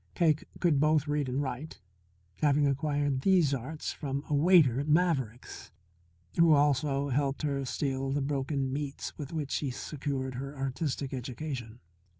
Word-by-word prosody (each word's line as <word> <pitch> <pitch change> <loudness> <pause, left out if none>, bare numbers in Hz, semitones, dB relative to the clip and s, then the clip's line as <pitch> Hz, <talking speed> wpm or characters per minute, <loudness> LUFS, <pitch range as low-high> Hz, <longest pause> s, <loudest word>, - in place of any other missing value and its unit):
Cake 155 -4 +2
could 165 -6 +3
both 155 0 +3
read 145 -2 0
and 135 +3 0
write, 135 +3 -5 0.6
having 145 -1 +4
acquired 145 -1 0
these 175 -5 +4
arts 135 +5 -4
from 140 -1 -4
a - - -2
waiter 145 -5 +5
at 145 - -3
Maverick's, 150 -8 0 0.7
who 165 -1 +7
also 145 -1 +2
helped 140 +2 0
her 140 -2 -1
steal 135 0 -2
the 145 - 0
broken 135 -1 -1
meats 145 -1 -4
with 145 -2 -7
which 150 -4 -3
she 145 - -1
secured 130 0 -4
her 135 +3 -6
artistic 135 0 -2
education. 125 -2 -5
140 Hz, 150 wpm, -30 LUFS, 135-150 Hz, 0.7 s, who